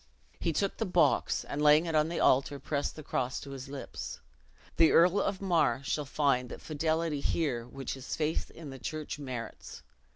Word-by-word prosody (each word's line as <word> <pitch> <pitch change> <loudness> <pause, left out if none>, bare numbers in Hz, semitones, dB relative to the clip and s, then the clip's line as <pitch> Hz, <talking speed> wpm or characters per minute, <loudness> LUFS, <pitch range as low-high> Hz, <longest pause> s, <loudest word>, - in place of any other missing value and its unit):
He 165 - 0
took 195 +5 -1
the 225 - -1
box, 170 -6 +2
and 145 - -4
laying 150 +2 +6
it 165 - -2
on 155 0 +3
the 170 - -2
altar, 135 +2 +3
pressed 140 0 -2
the 155 - -8
cross 130 -1 -1
to 140 - -9
his 135 -1 -7
lips. 140 -1 -6 0.6
"The 165 -1 +6
Earl 180 +4 +5
of 195 0 -2
Mar 150 -9 +2
shall 145 +4 -1
find 135 -3 +1
that - - -7
fidelity 160 0 -1
here 130 -6 -1
which 135 +1 -5
his 130 -1 -5
faith 155 0 -1
in 155 -4 -10
the 135 - -9
church 155 +3 -5
merits. 125 -5 -7
150 Hz, 190 wpm, -30 LUFS, 135-165 Hz, 0.6 s, laying